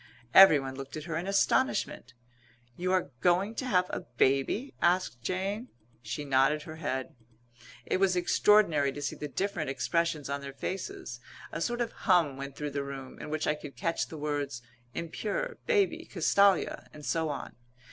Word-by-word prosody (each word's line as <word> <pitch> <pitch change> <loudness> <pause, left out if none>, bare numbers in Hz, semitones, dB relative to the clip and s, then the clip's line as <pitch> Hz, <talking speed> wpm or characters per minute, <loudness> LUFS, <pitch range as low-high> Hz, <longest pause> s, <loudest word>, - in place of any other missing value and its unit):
Everyone 145 -8 +8
looked 135 +1 -7
at 155 - -6
her 165 0 -4
in 170 +3 -3
astonishment. 195 - +1 0.6
"You 185 +1 -1
are 185 -6 +1
going 185 +4 +3
to 255 +3 -4
have 180 -6 +3
a - - -2 0.2
baby?" 140 - +2
asked 175 -8 +2
Jane. 195 - -2 0.3
She 145 +3 -5
nodded 135 +2 +3
her 155 0 -9
head. 130 -4 -3 0.7
It - - +1
was 190 -1 +3
extraordinary 175 -5 +4
to 145 - -7
see - - -2
the 150 - -5
different 170 -1 -2
expressions 145 +4 0
on 140 0 -3
their 140 -1 -7
faces. 135 -6 -5 0.3
A 165 - -4
sort 240 +6 -1
of 235 -1 -1
hum 175 -8 +2
went 140 0 -7
through 150 -1 -4
the 140 0 -2
room, 135 -1 -8
in - - -7
which 155 0 -1
I - - +2
could 150 -2 -9
catch 165 -3 -1
the 160 - -8
words 145 -4 -3 0.3
"impure," 215 - -3
"baby," 385 -7 +1
"Castalia," 195 +1 +2
and 150 -1 -11
so 160 -1 0
on. 145 - -5
160 Hz, 170 wpm, -30 LUFS, 140-190 Hz, 0.7 s, Everyone